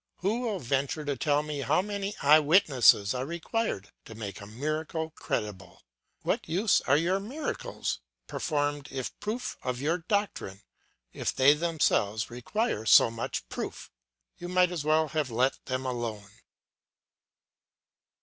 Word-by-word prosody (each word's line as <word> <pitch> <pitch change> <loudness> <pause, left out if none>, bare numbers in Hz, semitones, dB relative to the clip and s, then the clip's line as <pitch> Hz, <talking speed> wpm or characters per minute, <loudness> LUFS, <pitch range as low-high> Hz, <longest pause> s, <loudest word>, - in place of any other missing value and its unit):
Who 205 +6 +1
will 230 -5 -1
venture 140 +1 -1
to 145 -1 -1
tell 145 +2 +1
me 150 -1 -4
how 155 +6 +2
many 205 0 -3
eye 150 +2 +8
witnesses 140 - +5
are 125 0 -2
required 170 - -3
to 110 - -10
make 105 -1 -6
a 100 - -9
miracle 155 +7 -3
credible! 100 -9 -5 0.4
What - - -1
use 190 +5 +3
are 140 - +5
your 180 +5 +1
miracles, 295 - -4 0.3
performed 145 -2 -2
if 130 -2 -5
proof 225 +4 -4
of 125 -1 -3
your 160 +6 0
doctrine, 165 - -2 0.5
if - - -2
they 135 +2 +6
themselves 150 -10 0
require 125 - -2
so 115 - +7
much 115 0 -4
proof! - - -6 0.5
You 175 - -6
might 180 0 +3
as 170 -5 -3
well 155 0 +2
have 155 -4 -1
let 125 +3 0
them 130 0 -3
alone. 115 -5 -4
150 Hz, 140 wpm, -29 LUFS, 125-180 Hz, 0.5 s, eye